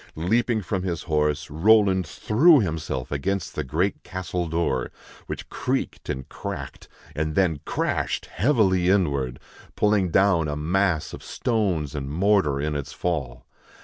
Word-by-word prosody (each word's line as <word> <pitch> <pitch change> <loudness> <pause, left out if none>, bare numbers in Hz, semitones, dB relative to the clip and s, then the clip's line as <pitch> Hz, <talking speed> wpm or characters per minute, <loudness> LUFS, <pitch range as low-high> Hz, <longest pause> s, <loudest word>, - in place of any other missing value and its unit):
Leaping 110 +6 +1
from 95 +1 -2
his 90 -2 -3
horse, 75 -2 0
Roland 95 +1 +4
threw 145 - +4
himself 80 - -3
against 95 +6 -2
the - - -2
great 85 +9 -1
castle 90 -2 -4
door, 80 -6 -1 0.4
which - - -6
creaked - - -3
and 65 0 -4
cracked, - - -7 0.3
and 75 +1 -2
then 85 -6 +2
crashed - - -1
heavily 95 - +2
inward, 70 -10 +1 0.4
pulling 105 -3 +2
down 90 -3 +3
a 75 - -2
mass 85 +2 0
of - - -8
stones 95 - -1
and 70 -2 -4
mortar 85 -3 +2
in 75 +1 -1
its 70 -1 -4
fall. 70 -9 -3
85 Hz, 140 wpm, -24 LUFS, 75-100 Hz, 0.4 s, Roland